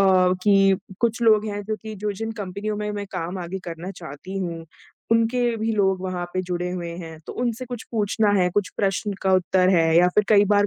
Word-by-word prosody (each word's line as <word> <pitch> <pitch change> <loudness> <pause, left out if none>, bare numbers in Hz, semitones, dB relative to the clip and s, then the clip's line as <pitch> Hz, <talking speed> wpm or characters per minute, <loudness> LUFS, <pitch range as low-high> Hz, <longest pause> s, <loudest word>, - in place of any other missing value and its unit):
कि 190 +1 +4 0.2
कुछ 235 0 +1
लोग 215 -2 +5
हैं 205 -1 -3
जो 215 +1 -2
कि 220 -1 -6
जो 210 0 -3
जिन 225 +3 -4
कंपनियों 205 0 -4
में 210 0 -3
मैं 205 -1 -4
काम 175 +3 -3
आगे 180 +2 -4
करना 170 +2 -6
चाहती 175 +2 -8
हूँ, 170 -3 -4 0.5
उनके 230 +2 +3 0.2
भी 225 +1 -1
लोग 190 -2 +2
वहाँ 185 -2 -3
पे 185 - 0
जुड़े 180 0 -2
हुए 175 -1 -4
हैं। 165 -3 -8
तो - - -6
उनसे 240 0 -1
कुछ 245 -2 -6
पूछना 215 -1 +1
है, 185 -3 +3
कुछ 205 -2 +1
प्रश्न 200 +1 0
का 190 - +2
उत्तर 185 0 +3
है 165 -3 +4
या 180 +1 +6
फिर 210 - +4
कई 205 -2 +6
बार 205 0 +4
195 Hz, 215 wpm, -23 LUFS, 180-210 Hz, 0.5 s, या